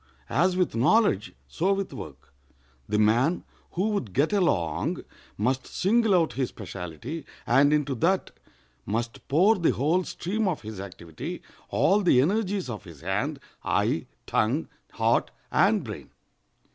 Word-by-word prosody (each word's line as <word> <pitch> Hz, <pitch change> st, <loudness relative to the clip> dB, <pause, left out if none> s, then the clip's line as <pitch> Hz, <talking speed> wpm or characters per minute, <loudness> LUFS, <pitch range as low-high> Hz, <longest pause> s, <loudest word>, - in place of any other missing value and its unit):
As 180 Hz, +4 st, +2 dB
with 180 Hz, -2 st, +1 dB
knowledge, 120 Hz, -, +3 dB, 0.2 s
so 185 Hz, -, +1 dB
with 195 Hz, -5 st, -3 dB
work. 70 Hz, -, -10 dB, 0.6 s
The 105 Hz, -, +1 dB
man 120 Hz, +10 st, +3 dB, 0.3 s
who 190 Hz, +5 st, 0 dB
would 140 Hz, -, -2 dB
get 150 Hz, -, +2 dB
along 90 Hz, -, +1 dB, 0.3 s
must 130 Hz, +5 st, 0 dB
single 220 Hz, +1 st, +2 dB
out 165 Hz, -3 st, +2 dB
his 130 Hz, -2 st, -1 dB
specialty, 100 Hz, -, -7 dB, 0.2 s
and 140 Hz, +4 st, +4 dB
into 150 Hz, -2 st, +1 dB
that 175 Hz, +10 st, +1 dB, 0.5 s
must 115 Hz, +3 st, -3 dB
pour 185 Hz, +10 st, +5 dB
the 170 Hz, -, +2 dB
whole 160 Hz, +8 st, +1 dB
stream 205 Hz, +5 st, -2 dB
of 175 Hz, -9 st, -2 dB
his 105 Hz, -2 st, -7 dB
activity—all 95 Hz, -, -2 dB
the 175 Hz, -9 st, +5 dB
energies 195 Hz, +4 st, +1 dB
of 110 Hz, -6 st, -6 dB
his 85 Hz, -6 st, -12 dB
hand, 105 Hz, -, -1 dB, 0.2 s
eye, -, -, 0 dB, 0.2 s
tongue, 125 Hz, +9 st, 0 dB, 0.2 s
heart, -, -, +2 dB, 0.2 s
and -, -, +3 dB
brain. -, -, -8 dB
140 Hz, 135 wpm, -26 LUFS, -, 0.6 s, pour